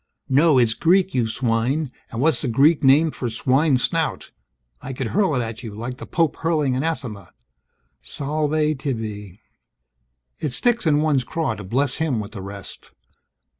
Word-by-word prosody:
(No, 145 +2 +4
it's 120 -3 +4
Greek, 185 +6 +2
you 120 -3 +1
swine. 125 +5 0 0.2
And 115 - -6
what's 160 +3 +2
the 145 - -2
Greek 145 +6 +3
name 145 +4 +5
for 125 - -4
Swine's 130 +3 +2
Snout? 165 -4 -1 0.5
I 135 - -6
could 125 -2 -3
hurl 190 - +1
it 125 - 0
at 115 +1 -6
you, 110 -4 -8
like 120 +3 -5
the - - -8
Pope 165 -3 0
hurling 155 -6 0
anathema.) 130 - -3 0.7
Salve 150 +1 -1
tibi! 110 - -5 1.0
It 145 - -2
sticks 235 - +1
in 150 -1 +3
one's 150 -4 +2
craw 155 0 -2
to 105 -1 -8
bless 130 +7 -1
him 155 -8 0
with 105 -1 -6
the 100 - -7
rest. 100 0 -10
135 Hz, 165 wpm, -22 LUFS, 115-155 Hz, 1.0 s, name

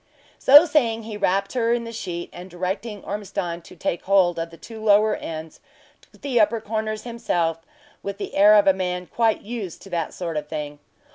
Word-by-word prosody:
So 290 +5 +9
saying, 235 -8 +1
he 215 -1 -7
wrapped 195 -1 0
her 235 -2 +1
in 240 -1 -1
the 230 - -7
sheet, 180 -6 -5
and 180 +1 -9
directing 190 +4 -4
Ormiston 195 -4 -4
to 170 - -15
take 175 - -2
hold 185 -3 +3
of 165 0 -3
the 165 - -14
two 220 +3 -10
lower 210 0 +4
ends, 160 0 -7 0.5
took - - -22
the 265 -4 +1
upper 220 +2 +3
corners 215 0 -3
himself, 175 -9 -1 0.4
with 200 0 -5
the - - -6
air 205 +2 +7
of 205 - +6
a 195 - +6
man 180 -1 -3
quite 225 +2 0
used 210 -6 -6
to 195 - -13
that 170 -3 -2
sort 170 -3 -4
of 150 0 -4
thing. 150 -1 -5
200 Hz, 200 wpm, -23 LUFS, 175-225 Hz, 0.5 s, So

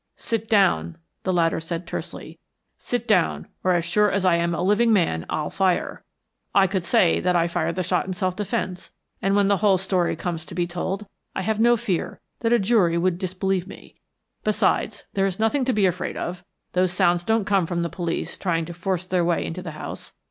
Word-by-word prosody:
"Sit 225 -1 -3
down," 85 - +3 0.2
the 190 - -1
latter 165 -2 +2
said 165 +1 -5
tersely. - - -7 0.4
"Sit 245 -1 -3
down, 185 -7 +2 0.2
or, 185 - +3
as 170 -1 +1
sure 210 +5 +3
as 195 -1 0
I 180 -2 +5
am 170 0 0
a - - -2
living 210 +5 +3
man, 165 - +1
I'll 150 - -2
fire. 190 -2 0 0.5
I 195 - +6
could 190 -2 -1
say 180 -1 +3
that 180 0 +1
I 170 0 +3
fired 170 -1 -1
the 185 - -1
shot - - 0
in 190 - -2
self 185 -1 -1
defence, 185 -2 -3 0.3
and 195 +1 +2
when 200 -1 +4
the 200 0 +3
whole 200 -1 +4
story 185 -2 0
comes 165 -1 -4
to - - -9
be 175 - +1
told 185 +4 -3 0.3
I 190 - -2
have 220 +2 -1
no 240 +1 +5
fear 205 -7 -2 0.2
that 230 -1 0
a 240 - +6
jury 195 -5 +3
would 175 0 +1
disbelieve 185 0 -1
me. - - -12 0.5
Besides, - - +1
there 195 0 +2
is 190 -1 -3
nothing 235 +5 +2
to 260 - +1
be 205 -2 +3
afraid 180 -1 -1
of. 175 +1 -4 0.3
Those 185 0 +2
sounds 175 -1 +2
don't 220 +1 +1
come 195 -4 +2
from 170 -1 -1
the - - 0
police 170 0 -4
trying 165 -3 0
to 170 - -7
force 185 +1 -2
their 180 -1 +1
way 170 0 +1
into 175 +3 -5
the 165 -4 -7
house. - - -8
185 Hz, 215 wpm, -24 LUFS, 170-200 Hz, 0.5 s, I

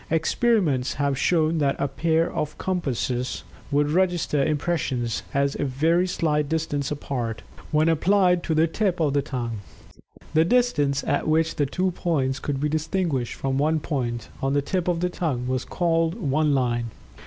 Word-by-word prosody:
Experiments 165 - +1
have 140 -1 0
shown 160 +2 +2
that 140 -2 +2
a 140 - 0
pair 160 +4 0
of 150 -1 -3
compasses 125 -8 -2 0.3
would 145 0 +1
register 175 -5 +1
impressions 140 -6 -1
as 140 0 +1
a - - +1
very 160 +7 +2
slight 150 -4 0
distance 155 -3 -1
apart 120 -6 -4 0.3
when 155 +1 +2
applied 180 +2 +3
to 160 - -1
the 160 +1 +4
tip 180 +2 -1
of 150 -4 +1
the 145 - +2
tongue. 120 -6 -4 0.7
The 160 0 +5
distance 160 - +2
at - - 0
which 160 +1 +1
the 145 - +1
two 185 +6 0
points 140 -7 -1
could 140 -2 -3
be 150 - +1
distinguished 155 -4 -1
from 135 0 -1
one 155 +2 +2
point, 120 -7 -3
on 135 +1 0
the 145 0 +1
tip 180 +4 -2
of 175 -1 0
the 180 - +1
tongue, 140 -9 -2
was 130 0 -1
called 165 -1 +1
"one 150 - +1
line." 120 -2 0
150 Hz, 165 wpm, -24 LUFS, 135-165 Hz, 0.7 s, The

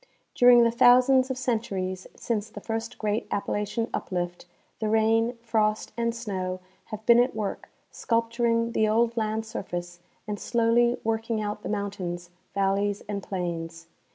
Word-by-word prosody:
During 245 -1 +7
the 230 - +3
thousands 255 +2 +5
of 260 - -2
centuries 195 -7 -2
since 220 -2 -2
the 220 - -9
first 225 0 -4
great 215 +1 -1
Appa 200 - -2
lachian 210 +3 -1
uplift, 175 -1 -3 0.3
the 215 - -1
rain, 225 +2 +2
frost, 215 -2 0
and 235 0 -1
snow 185 -5 -3 0.3
have 215 0 -8
been 235 0 +7
at 245 0 +2
work 210 -2 -4 0.2
sculpturing 230 0 0
the 220 -2 +2
old 230 +2 +2
land 220 -1 -1
surface 175 -5 -6 0.3
and 205 -1 -3
slowly 235 +1 +2
working 225 0 -1
out 210 0 -3
the - - -5
mountains, 185 -4 -4 0.2
valleys, 200 +1 0
and 205 -1 -3
plains. 170 -3 -4
220 Hz, 150 wpm, -26 LUFS, 200-230 Hz, 0.3 s, During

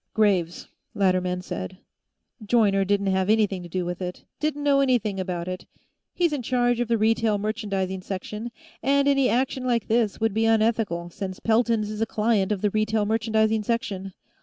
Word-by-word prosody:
"Graves," 190 -6 +1 0.3
Latterman 185 -2 +1
said. 185 0 -6 0.7
"Joyner 205 -3 +3
didn't 200 0 +1
have 190 +1 0
anything 210 -4 +2
to 175 - -10
do 180 +1 -2
with 180 +1 -4
it; 180 0 -5 0.2
didn't 295 -1 -2
know 280 -1 +4
anything 235 -7 +1
about 180 -2 -3
it. 185 0 -6 0.5
He's 345 -3 +1
in 285 - -2
charge 245 0 +1
of 240 - 0
the 230 0 +2
Retail 220 0 +2
Merchandising 200 -3 -2
section, 210 +5 -5 0.3
and 280 +3 +2
any 275 -2 +3
action 255 +3 0
like 240 -2 0
this 225 -2 +1
would 225 -2 +1
be 225 +1 +1
unethical, 215 -6 +1
since 185 +1 -6
Pelton's 225 -2 +1
is 215 0 -5
a 225 - +1
client 215 -2 +1
of 200 -3 -1
the 210 - +1
Retail 215 0 +1
Merchandising 220 0 +1
section. 200 -4 -3
215 Hz, 175 wpm, -25 LUFS, 190-230 Hz, 0.7 s, know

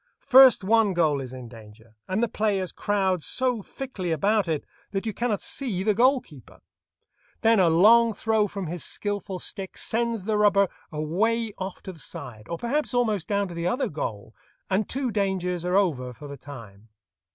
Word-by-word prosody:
First 260 -5 +7
one 215 -1 +3
goal 155 -5 +2
is 130 -2 -7
in 130 -2 -9
danger, 110 -1 -15
and 190 +5 0
the - - +2
players 200 -5 -1
crowd 190 -4 0
so 250 +4 0
thickly 200 -6 -5
about 200 +5 +1
it 155 -3 -2 0.2
that 195 +1 -3
you 220 - -2
cannot 235 -3 -1
see 220 -9 0
the 210 +1 +2
goal 255 +5 +4
keeper. 140 -7 -16 0.8
Then 225 -1 +4
a 180 -3 +5
long 225 +8 +6
throw 220 0 +1
from 195 -1 -5
his 170 0 -5
skilful 205 -2 -3
stick 190 +1 -5
sends 230 -2 -1
the 210 +1 0
rubber 200 -2 +4 0.2
away 210 +9 -1
off 190 0 -6
to 190 - -7
the 165 - -14
side, 120 -7 -7
or 170 - -3
perhaps 270 - -1
almost 215 -8 0
down 200 -1 0
to - - -7
the 170 +1 -2
other 250 +9 0
goal, 110 -7 -5 0.4
and 195 +2 +1
two 260 -2 -1
dangers 185 -4 -1
are 180 +2 +1
over 135 -11 0
for 145 +5 -11
the 140 - -7
time. 115 -7 -12
195 Hz, 185 wpm, -25 LUFS, 160-220 Hz, 0.8 s, First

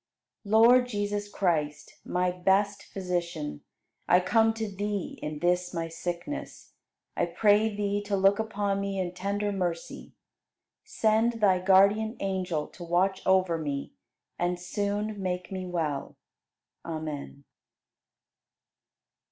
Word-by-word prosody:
73. 200 - -7 0.2
Lord 250 0 +6
Jesus 205 -2 -2
Christ, 160 -7 -1
my 180 0 0
best 195 +3 +1
Physician, 170 - -3 0.5
I 180 - +6
come 225 +4 +3
to 225 -1 -2
Thee 205 -1 -4
in 150 0 -4
this 180 +2 0
my 165 0 -2
sickness. 175 - -6 0.4
I - - +1
pray 210 +1 +3
Thee 205 0 -1
to 200 -1 +1
look 195 +2 +4
upon 205 -2 -1
me 200 0 -3
in 180 -1 -2
tender 200 +2 -2
mercy. 175 -4 -4 0.7
Send 220 +2 +2
Thy 205 -5 +3
guardian 200 +4 +4
angel 185 -5 -1
to 175 - -11
watch 185 +3 +1
over 185 -3 +3
me 140 -3 -4 0.5
and 175 0 0
soon 205 +3 -2
make 180 0 -3
me 185 -1 -4
well. 155 -6 -3 0.7
Amen. 155 -3 -6
190 Hz, 120 wpm, -28 LUFS, 175-205 Hz, 0.7 s, Lord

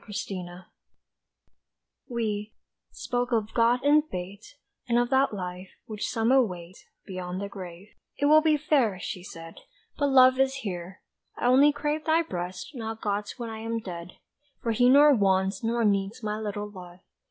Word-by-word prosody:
HUMAN 195 -3 -5
LOVE 175 +1 -11 1.5
We, 215 -3 -3 0.3
spoke 245 +1 -3
of 220 -2 0
God 240 +2 +3
and 295 +1 +5
Fate, 190 +7 -8 0.3
And 235 - +3
of 240 +1 +1
that 265 +1 +3
Life 180 -2 -6 0.2
which 215 -2 -4
some 225 0 +1
await 185 -9 +1 0.3
Beyond 185 -1 -5
the 200 - -4
grave, 185 -1 -10 0.3
"It 285 - 0
will 305 +1 +7
be 310 -1 +3
fair," 265 - +1
she 185 0 -5
said, 165 -2 -10 0.4
"But 285 - +2
love 260 -1 +6
is 270 0 +2
here! 180 -1 -6 0.3
I - - -3
only 265 +4 +6
crave 300 +1 -3
thy 325 +1 +3
breast 180 - -6
Not 225 -3 -5
God's 205 0 -3
when 235 -2 -5
I 220 - -7
am 225 +1 -3
dead. 180 -5 -7 0.5
For 230 - 0
He 245 +3 +4
nor 290 +2 +7
wants 195 -2 +1
nor 230 0 +1
needs 200 +3 0
My 210 0 -2
little 210 -1 -4
love. 180 -3 -12
215 Hz, 165 wpm, -27 LUFS, 190-255 Hz, 1.5 s, will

